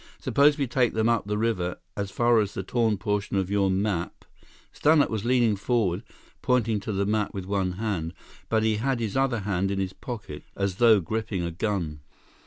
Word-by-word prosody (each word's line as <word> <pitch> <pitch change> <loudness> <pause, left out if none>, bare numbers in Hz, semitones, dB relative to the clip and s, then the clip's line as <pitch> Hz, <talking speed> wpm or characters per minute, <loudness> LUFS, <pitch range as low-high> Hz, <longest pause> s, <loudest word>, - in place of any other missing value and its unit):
Suppose 145 +1 +3
we 140 - +1
take 125 -2 +1
them 110 0 +2
up 115 -3 +1
the 105 0 -1
river, 100 -6 -1 0.2
as 100 -1 -3
far 120 +2 +3
as 105 -2 -1
the 95 - -3
torn 110 +1 +1
portion 105 -1 -1
of 95 0 -1
your 100 -1 +2
map—" 95 -2 -2 0.5
Stannart 150 -1 +3
was 110 -1 -2
leaning 120 -3 +3
forward, 100 -4 0 0.4
pointing 115 -4 +1
to 100 - -5
the 100 0 0
map 105 0 -1
with 95 -2 -4
one 95 -2 -1
hand, 90 -5 -3 0.3
but 110 -1 +2
he 110 -1 +2
had 130 +2 0
his 110 -4 -3
other 135 -4 +1
hand 95 -1 -1
in 100 - -2
his 95 -1 -2
pocket, 105 -3 -7
as 100 -2 -2
though 115 -4 +6
gripping 110 0 -3
a 85 - -2
gun. 85 -4 -2
105 Hz, 195 wpm, -26 LUFS, 95-115 Hz, 0.5 s, though